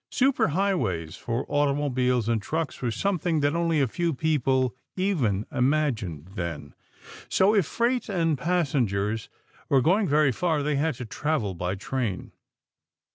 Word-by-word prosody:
Super 270 Hz, +1 st, +2 dB
highways 150 Hz, -, -1 dB
for 120 Hz, +3 st, -3 dB
automobiles 135 Hz, -5 st, +1 dB
and 115 Hz, -2 st, +1 dB
trucks 160 Hz, +6 st, -3 dB
were 125 Hz, -, 0 dB
something 170 Hz, -, 0 dB
that 145 Hz, +2 st, +1 dB
only 165 Hz, -2 st, +1 dB
a 135 Hz, -, +3 dB
few 170 Hz, +5 st, -1 dB
people 130 Hz, -4 st, +1 dB, 0.2 s
even 135 Hz, -, 0 dB
imagined 125 Hz, -, 0 dB
then. 85 Hz, -2 st, -5 dB, 0.6 s
So 195 Hz, +3 st, +4 dB
if 200 Hz, -7 st, +3 dB
freight 240 Hz, 0 st, 0 dB
and 165 Hz, -5 st, +1 dB
passengers 125 Hz, -, 0 dB, 0.4 s
were 135 Hz, -, +5 dB
going 185 Hz, -, +3 dB
very 150 Hz, -2 st, +3 dB
far, 160 Hz, +2 st, 0 dB
they 150 Hz, -1 st, 0 dB
had 155 Hz, 0 st, 0 dB
to 125 Hz, -, -6 dB
travel 120 Hz, -4 st, -1 dB
by 90 Hz, +2 st, -3 dB
train. 105 Hz, -1 st, -3 dB
145 Hz, 140 wpm, -26 LUFS, 115-165 Hz, 0.6 s, were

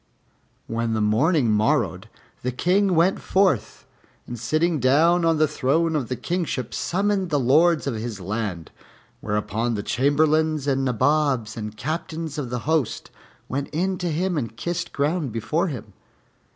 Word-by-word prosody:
When 115 Hz, 0 st, -2 dB
the -, -, 0 dB
morning 120 Hz, +5 st, +2 dB
morrowed 105 Hz, +1 st, +1 dB, 0.4 s
the 125 Hz, -, -2 dB
King 185 Hz, +8 st, +2 dB
went 170 Hz, +4 st, +3 dB
forth, 185 Hz, -, +1 dB, 0.4 s
and 120 Hz, -1 st, -7 dB
sitting 155 Hz, +7 st, +1 dB
down 160 Hz, +7 st, +4 dB
on 165 Hz, -1 st, +3 dB
the 155 Hz, 0 st, +3 dB
throne 160 Hz, +5 st, +1 dB
of 135 Hz, -6 st, -1 dB
the 130 Hz, -, -2 dB
Kingship, 165 Hz, -7 st, -3 dB
summoned 195 Hz, 0 st, 0 dB
the 145 Hz, -3 st, +1 dB
Lords 155 Hz, +6 st, +3 dB
of 140 Hz, -, -1 dB
his 110 Hz, -1 st, -5 dB
land; 95 Hz, -4 st, -4 dB, 0.5 s
whereupon 105 Hz, +3 st, -1 dB
the 100 Hz, -, -3 dB
Chamberlains 155 Hz, +4 st, +2 dB
and 135 Hz, -1 st, +1 dB
Nabobs 130 Hz, -2 st, +1 dB
and 105 Hz, -1 st, -6 dB
Captains 160 Hz, +3 st, -4 dB
of 130 Hz, -4 st, -4 dB
the 125 Hz, 0 st, -3 dB
host 155 Hz, -5 st, -1 dB, 0.4 s
went 140 Hz, +2 st, -3 dB
in 185 Hz, +3 st, -1 dB
to 175 Hz, -, -1 dB
him 175 Hz, +1 st, 0 dB
and 115 Hz, -3 st, -6 dB
kissed 175 Hz, +3 st, -3 dB
ground 145 Hz, -1 st, -1 dB
before 115 Hz, -, -1 dB
him. 115 Hz, -, -7 dB
145 Hz, 150 wpm, -23 LUFS, 115-165 Hz, 0.5 s, down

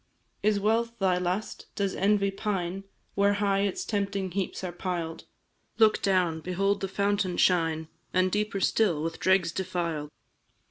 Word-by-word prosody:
"Is 210 Hz, 0 st, +2 dB
wealth 230 Hz, +3 st, +1 dB
thy 185 Hz, -3 st, +2 dB
lust 180 Hz, +4 st, -3 dB
does 200 Hz, -2 st, 0 dB
envy 200 Hz, 0 st, +2 dB
pine 195 Hz, -2 st, -3 dB, 0.3 s
Where 200 Hz, 0 st, +3 dB
high 200 Hz, -1 st, +1 dB
its 200 Hz, -1 st, -1 dB
tempting 200 Hz, -3 st, -2 dB
heaps 190 Hz, 0 st, -3 dB
are 180 Hz, -, -3 dB
piled? 175 Hz, -2 st, -4 dB, 0.5 s
Look 220 Hz, -1 st, +4 dB
down, 180 Hz, -4 st, +2 dB
behold 195 Hz, +3 st, 0 dB
the 195 Hz, -, -1 dB
fountain 200 Hz, -1 st, 0 dB
shine, 165 Hz, -3 st, +2 dB, 0.2 s
And, 185 Hz, 0 st, +2 dB
deeper 210 Hz, 0 st, -1 dB
still, 180 Hz, -10 st, +2 dB
with 165 Hz, 0 st, -4 dB
dregs 185 Hz, -3 st, +3 dB
defiled! 170 Hz, -5 st, -3 dB
195 Hz, 145 wpm, -28 LUFS, 180-200 Hz, 0.5 s, Look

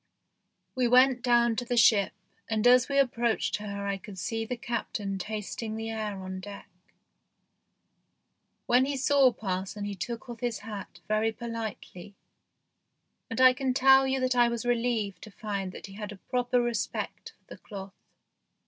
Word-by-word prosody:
We 255 Hz, -2 st, +1 dB
went 250 Hz, +1 st, +5 dB
down 235 Hz, -1 st, +3 dB
to 245 Hz, -, -1 dB
the 245 Hz, 0 st, -2 dB
ship, 205 Hz, -4 st, +5 dB, 0.4 s
and 220 Hz, 0 st, 0 dB
as 250 Hz, +1 st, +6 dB
we 280 Hz, -, 0 dB
approached 240 Hz, -4 st, +1 dB
her 200 Hz, -1 st, -5 dB
I 200 Hz, -1 st, -1 dB
could 200 Hz, -1 st, -11 dB
see 225 Hz, +6 st, -3 dB
the 250 Hz, -, -3 dB
Captain 225 Hz, -5 st, -3 dB
tasting 215 Hz, +2 st, -4 dB
the 225 Hz, 0 st, -4 dB
air 215 Hz, -3 st, -4 dB
on 185 Hz, 0 st, -6 dB
deck. 200 Hz, +1 st, -9 dB, 2.0 s
When 250 Hz, +2 st, +4 dB
he 280 Hz, 0 st, -2 dB
saw 270 Hz, 0 st, +4 dB
parson 195 Hz, -1 st, -4 dB
he 205 Hz, -, -3 dB
took 230 Hz, +6 st, -5 dB
off 240 Hz, -1 st, -8 dB
his 240 Hz, -3 st, -2 dB
hat 200 Hz, -5 st, -8 dB
very 215 Hz, +1 st, +1 dB
politely, 220 Hz, -4 st, -7 dB, 1.1 s
and 225 Hz, -, -4 dB
I 255 Hz, 0 st, +8 dB
can 260 Hz, 0 st, -1 dB
tell 265 Hz, 0 st, +6 dB
you 265 Hz, 0 st, 0 dB
that 255 Hz, 0 st, +1 dB
I 240 Hz, -1 st, +5 dB
was 235 Hz, 0 st, -3 dB
relieved 235 Hz, -4 st, 0 dB
to -, -, -10 dB
find 200 Hz, -3 st, -4 dB
that -, -, -9 dB
he 195 Hz, -, -11 dB
had 210 Hz, +1 st, -6 dB
a 205 Hz, -, -9 dB
proper 245 Hz, +3 st, 0 dB
respect 240 Hz, -2 st, -3 dB
for -, -, -41 dB
the -, -, -12 dB
cloth. 195 Hz, -2 st, -9 dB
225 Hz, 165 wpm, -28 LUFS, 205-245 Hz, 2.0 s, I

